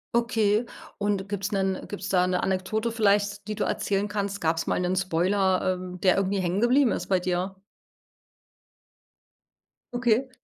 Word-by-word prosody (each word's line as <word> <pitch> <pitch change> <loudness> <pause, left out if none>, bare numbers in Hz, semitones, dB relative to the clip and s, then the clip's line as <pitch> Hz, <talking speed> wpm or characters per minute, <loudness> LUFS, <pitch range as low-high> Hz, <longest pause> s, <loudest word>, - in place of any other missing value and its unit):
Okay 225 -2 +2 0.3
und 200 -1 -1
gibt's 200 +1 -3
'nen 190 -1 -1
gibt's 200 -1 -6
da 180 -1 +3
'ne 180 0 0
Anekdote 195 +5 -1
vielleicht, 205 -2 +1
die 215 - -3
du - - -1
erzählen 200 +1 -1
kannst, 200 -1 -3
gab's 165 0 0
mal - - +1
'nen 180 +1 0
Spoiler 185 +1 +1
ähm, 180 0 -8
der 185 -1 +4
irgendwie 195 0 0
hängen 180 +2 0
geblieben 245 +2 +4
ist - - -3
bei 185 -2 +2
dir? 185 +1 -2 2.4
Okay. 245 +2 +1
195 Hz, 150 wpm, -26 LUFS, 185-210 Hz, 2.4 s, der